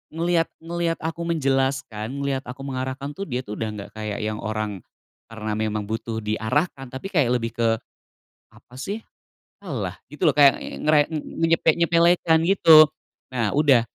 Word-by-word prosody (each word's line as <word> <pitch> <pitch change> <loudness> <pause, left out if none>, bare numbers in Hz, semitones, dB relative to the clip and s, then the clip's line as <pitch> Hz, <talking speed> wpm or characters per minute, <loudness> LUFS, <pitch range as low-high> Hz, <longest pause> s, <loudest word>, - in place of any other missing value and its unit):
ngelihat 170 0 +1
ngelihat 170 0 -2
aku 165 +1 -3
menjelaskan, 135 -5 -1
ngelihat 140 -1 -1
aku 125 +2 -8
mengarahkan 130 +2 -4
tuh 195 - -4
dia 125 -1 -1
tuh 105 - -6
udah 110 - -2
nggak 100 0 -8
kayak 105 -1 -4
yang 110 0 -3
orang 110 -3 -3 0.5
karena 110 -1 -4
memang 110 -1 -1
butuh 110 +1 -3
diarahkan, 125 +6 -1
tapi 130 +9 -6
kayak 135 -7 +3
lebih 115 0 -5
ke, 115 -1 +1 0.7
"Apa 125 - -18
sih, 205 +8 -4 0.6
alah", 105 - -4 0.2
gitu 160 +2 +2
loh, 145 - 0
kayak 140 -2 +6 0.2
ngere 150 -1 +3
enyepek 165 +1 +1
nyepelekan, 170 -1 +4
gitu. 165 -4 +8 0.5
Nah, 115 -5 0
udah 140 -6 +5
135 Hz, 150 wpm, -23 LUFS, 110-160 Hz, 0.7 s, gitu